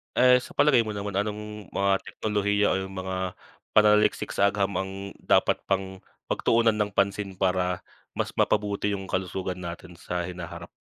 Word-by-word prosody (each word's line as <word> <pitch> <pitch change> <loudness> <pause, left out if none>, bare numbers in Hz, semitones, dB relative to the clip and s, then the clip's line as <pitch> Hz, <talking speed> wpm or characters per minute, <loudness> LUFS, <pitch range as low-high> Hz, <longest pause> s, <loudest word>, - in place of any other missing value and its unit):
Eh, 125 0 +6
sa - - -11
palagay 140 -5 +4
mo 110 - -4
naman, 100 -1 -4
anong 105 +1 -4
mga 100 0 +1
teknolohiya 105 -1 0
o - - +2
yung 95 0 -7
mga 95 0 -3 0.4
pananaliksik 105 0 +4
sa 100 0 +4
agham 100 -1 -1
ang 95 +1 -2 0.3
dapat - - +4
pang 95 -1 -2 0.2
pagtuunan 115 -1 +2
ng 105 -1 0
pansin 100 0 0
para 90 -1 +1 0.3
mas - - -3
mapabuti 105 0 +1
yung 95 -1 -4
kalusugan 95 0 -2
natin 85 +1 -7
sa 90 +1 -4
hinaharap? 90 -2 -7
100 Hz, 155 wpm, -26 LUFS, 95-105 Hz, 0.4 s, Eh